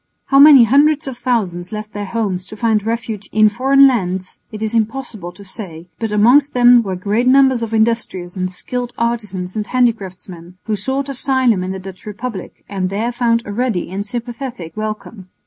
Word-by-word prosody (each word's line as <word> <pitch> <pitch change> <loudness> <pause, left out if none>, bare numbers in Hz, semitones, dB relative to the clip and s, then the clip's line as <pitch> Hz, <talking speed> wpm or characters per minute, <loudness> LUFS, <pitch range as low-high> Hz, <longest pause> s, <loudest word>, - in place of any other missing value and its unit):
How 275 - +3
many 285 -3 +9
hundreds 290 +5 +3
of 265 - -5
thousands 210 -8 -2
left 215 0 -6
their 205 -1 -5
homes 190 -4 -2
to 215 - -9
find 220 -2 +1
refuge 225 -2 -4
in 215 0 +5
foreign 270 +5 +4
lands 185 -7 -2
it 215 0 -6
is 220 +1 -2
impossible 225 -5 -3
to 200 - -14
say, 175 -4 -9
but 225 -2 -3
amongst 250 +8 +4
them 245 -1 +6
were 195 -4 -4
great 210 +7 -1
numbers 265 -2 +4
of 230 -1 -4
industrious 220 -6 -1
and 185 -1 -2
skilled 245 +6 -5
artisans 210 -6 -3
and 210 -1 -3
handicraftsmen, 185 -8 -2
who 215 - -2
sought 265 +7 -2
asylum 260 -6 +1
in 185 - -4
the 190 - -4
Dutch 190 +1 -11
Republic 210 -1 -7
and 190 -2 -2
there 215 +5 -2
found 235 -1 +1
a 205 - -6
ready 225 -7 -2
and 195 +2 -3
sympathetic 235 - -6
welcome. 215 -2 -6
220 Hz, 180 wpm, -17 LUFS, 190-245 Hz, -, many